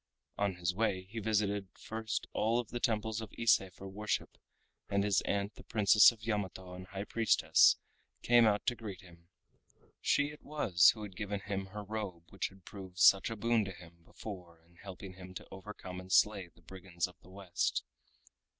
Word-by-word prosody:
On 100 -2 0
his 90 0 -1
way 95 -2 0
he 105 +5 -7
visited 105 -2 0
first 110 0 -3
of - - -37
all 115 +3 +1
the 120 +2 -6
temples 110 -2 0
of 110 - -8
Ise 115 -3 +5
for 95 +2 -10
worship, 105 +2 -3 0.5
and 100 0 +1
his 100 -3 +2
aunt 100 +1 -1
the - - -14
Princess 105 0 +6
of 115 -2 -16
Yamato 95 -4 -3
and 90 0 -9
High 100 +1 -5
Priestess 115 +1 +4 0.5
came 120 -1 +6
out 105 -1 +1
to 120 - +1
greet 105 -5 -8
him. 85 -1 -18 0.7
She 145 +1 +2
it 150 - -13
was 95 - +4
who 110 - -8
had 100 -3 -8
given 100 0 -3
him 95 -1 -4
her 105 +2 -7
robe 100 -5 -5
which 100 - -2
had 95 -2 -18
proved 95 -3 -10
such 95 +3 +6
a 115 - -4
boon 115 +1 +2
to 95 - -5
him 85 -2 -14
before 90 -5 -10
in 85 +1 -26
helping 95 0 -9
him 90 0 -11
to - - -7
overcome 95 -2 -8
and 95 0 -10
slay 100 -1 +4
the 85 -1 -24
brigands 90 0 -4
of 90 - -10
the - - -18
West. 95 -2 -2
100 Hz, 190 wpm, -33 LUFS, 90-110 Hz, 0.7 s, Princess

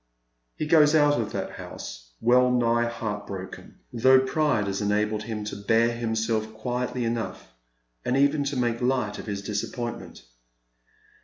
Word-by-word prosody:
He - - -3
goes 150 0 +5
out 145 -4 +4
of 110 -1 -4
that - - -4
house - - -9
well 125 +2 +4
nigh 120 -1 +2
heart 105 -3 -4
broken, 95 -1 -8
though 130 +3 +6
pride 130 -4 +1
has 100 +1 -2
enabled 105 +1 0
him 105 -1 -5
to 105 - -5
bear 115 +3 +2
himself 110 -1 -1
quietly 125 +2 -2
enough, 110 - -4 0.5
and 125 - 0
even 140 +1 +3
to 140 -1 -2
make 120 -1 0
light 125 -5 0
of - - -8
his 100 -1 -4
disappointment. 110 - -5
115 Hz, 150 wpm, -26 LUFS, 105-125 Hz, 0.5 s, though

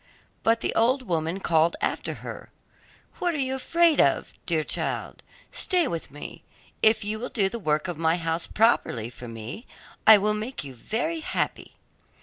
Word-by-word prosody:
But 225 0 +2
the - - -1
old 255 +4 +2
woman 165 -2 -1
called 165 -1 +3
after - - -2
her, - - -7 0.7
'What 350 -2 0
are - - -1
you 265 -2 0
afraid 335 +3 +3
of, 140 - +1
dear 160 -3 +1
child? - - -3 0.3
Stay 355 -4 +1
with 165 -6 -4
me; 145 +2 -9 0.4
if 220 0 +4
you 215 +1 -2
will 250 - -4
do 195 -4 +1
the 235 - -5
work 155 -3 0
of 175 -3 -5
my 160 0 +3
house 165 0 -1
properly 125 - +1
for 120 0 -10
me, 115 - -8 0.4
I 220 -1 +11
will 210 +1 +1
make 215 +2 -4
you 135 -2 -8
very 240 - -2
happy. 315 - -3
210 Hz, 170 wpm, -26 LUFS, 160-245 Hz, 0.7 s, I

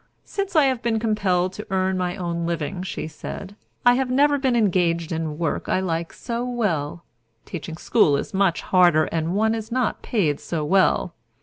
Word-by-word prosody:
"Since 395 -2 -4
I 310 - +6
have 260 -3 +1
been 230 -1 0
compelled 195 -5 +1
to 210 - -8
earn 190 0 +1
my 180 -1 -1
own 170 -3 -3
living," 170 +2 -3
she 185 - -4
said, 195 +5 -8 0.3
"I 245 - +7
have 260 0 0
never 285 +3 +3
been 260 -3 +1
engaged 175 -6 +1
in 160 -2 -3
work 165 -2 -2
I - - +2
like 170 -3 -2
so 235 0 -4
well. 175 -11 -2 0.4
Teaching 160 -1 -6
school 160 -7 +3
is - - -5
much 190 -3 +2
harder, 175 -4 +4
and 165 +2 -1
one 220 +2 +2
is 225 0 -5
not 250 -1 0
paid 160 -11 0
so 160 -3 -3
well." 185 0 +2
185 Hz, 185 wpm, -23 LUFS, 170-230 Hz, 0.4 s, I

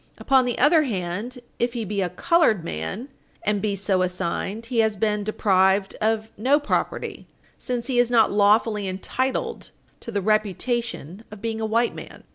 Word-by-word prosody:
Upon 265 -2 +3
the 245 - -2
other 310 +4 +5
hand, 210 - -3 0.2
if 240 0 0
he 235 -3 -3
be 200 0 -2
a 180 - 0
colored 220 - +2
man 165 - -5 0.3
and 210 -1 0
be 210 -2 0
so 195 -1 0
assigned, 185 +4 -2
he 235 0 -1
has 220 -2 +2
been 210 0 0
deprived 195 -2 +2
of 220 0 0
no 265 +8 +3
property, 290 - -2 0.3
since 245 -2 -3
he 250 -2 +1
is 245 -1 +3
not 230 -3 +4
lawfully 210 0 +3
entitled 260 - -3 0.3
to 230 - -8
the 205 - 0
reputation 215 - -1
of 215 - -10
being 225 +1 -3
a 220 - -1
white 230 +2 +1
man. - - -10
215 Hz, 170 wpm, -24 LUFS, 195-240 Hz, 0.3 s, other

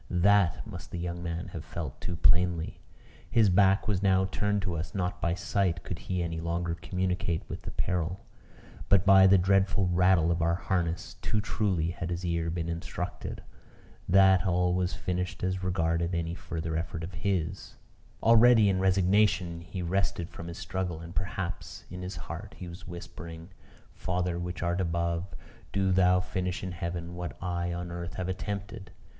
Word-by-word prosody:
That 95 0 +3
must - - -8
the - - -5
young 85 0 -4
man 85 +1 -4
have 85 -3 -6
felt 80 -3 -6
too 90 - -3
plainly. 85 -1 +2 0.5
His 110 -5 +4
back 95 +1 +4
was 100 -3 +1
now 95 -1 +4
turned 105 +1 0
to 90 -4 -2
us; 80 +6 -5
not 90 -2 -2
by 85 0 +1
sight 95 -3 0
could 90 - -5
he 90 -2 -2
any 80 -1 -3
longer 85 0 -1
communicate 90 -1 -2
with - - -6
the - - -6
peril; 90 +1 -2 0.6
but 100 -1 +5
by 95 -1 +8
the 95 +1 +7
dreadful 95 +1 +3
rattle 90 -1 +4
of 85 0 0
our 85 +1 +2
harness, 85 -2 -2
too 110 - 0
truly 95 -6 0
had 85 -1 -5
his 90 0 -3
ear 85 -1 0
been 85 0 -2
instructed 85 +1 -5 0.7
that 95 -1 +6
all 90 0 +2
was 90 0 0
finished 90 0 -3
as 95 0 -1
regarded 85 -1 0
any 85 0 -1
further 80 -2 -4
effort 85 0 -3
of 85 +3 -6
his. 90 0 -2 0.5
Already 115 -1 +7
in 95 -1 +1
resignation 95 -2 +3
he 85 +3 -6
had 85 - -3
rested 95 -2 0
from 85 - -8
his 85 - -7
struggle; 90 -4 -3
and 85 +1 -9
perhaps, 95 -1 -4
in 90 0 -6
his 90 +1 -5
heart 95 +5 -7
he 90 - -7
was 85 +2 -10
whispering 85 0 -8 0.4
"Father, 90 -1 -1
which 90 0 -4
art 85 +2 0
above, 85 0 -1 0.4
do 95 -1 +1
thou 90 0 +5
finish 90 0 -3
in 95 - -3
heaven 85 0 -4
what 90 0 -5
I 90 -1 -2
on 85 0 -4
earth 85 0 -5
have 90 -1 -3
attempted." 100 +1 -5
90 Hz, 175 wpm, -29 LUFS, 85-95 Hz, 0.7 s, by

